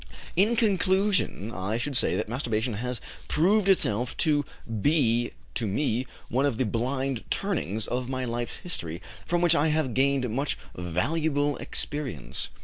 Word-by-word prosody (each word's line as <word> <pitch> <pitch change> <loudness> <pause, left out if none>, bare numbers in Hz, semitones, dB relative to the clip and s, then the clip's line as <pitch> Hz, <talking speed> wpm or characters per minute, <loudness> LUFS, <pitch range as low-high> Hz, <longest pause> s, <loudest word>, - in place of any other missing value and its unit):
"In 210 +6 +4
conclusion, 195 - +2
I 100 +3 -1
should 135 +4 -3
say - - +3
that - - -1
masturbation 115 -1 -1
has 125 +3 -3 0.3
proved 195 +5 +3
itself 120 - +2
to 145 -2 +3 0.4
be 120 -5 +3 0.2
to 115 - -1
me 120 +3 0 0.2
one 135 +4 +2
of 125 -6 -1
the 130 - +2
blind 130 +3 -1
turnings 130 - -1
of 125 0 -2
my 130 -1 -1
life's 120 0 -3
history, 85 - -5 0.3
from 175 0 +2
which 175 -1 +5
I 150 -1 +3
have 155 -5 +1
gained 135 0 +2
much 135 +6 -1 0.2
valuable 145 - 0
experience." 140 - -3
130 Hz, 145 wpm, -27 LUFS, 115-155 Hz, 0.4 s, which